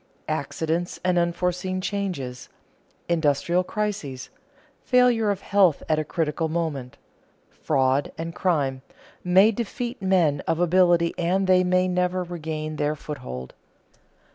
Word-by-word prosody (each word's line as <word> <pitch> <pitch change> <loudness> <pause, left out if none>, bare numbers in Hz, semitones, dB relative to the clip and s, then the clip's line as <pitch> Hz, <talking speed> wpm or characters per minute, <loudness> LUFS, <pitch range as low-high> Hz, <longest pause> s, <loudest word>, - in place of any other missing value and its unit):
Accidents 160 +3 -2
and 180 -1 +3
unforeseen 180 +2 -1
changes, 180 -11 -4 0.6
industrial 170 +2 +1
crises, 180 -12 -4 0.5
failure 245 -4 +3
of 200 -1 -1
health 195 -6 +3
at 155 -1 +2
a - - 0
critical 160 0 -2
moment, 155 -6 -3 0.5
fraud 135 -1 0
and 165 +1 -5
crime, 140 -9 0 0.4
may 190 +4 +5
defeat 235 +2 -4
men 175 -7 +2
of 165 - 0
ability 175 -1 +3
and 185 +3 +1
they 185 -1 +4
may 185 0 +2
never 180 0 0
regain 155 -3 -5
their 150 +1 0
foothold. 65 - -7
170 Hz, 115 wpm, -24 LUFS, 150-185 Hz, 0.6 s, may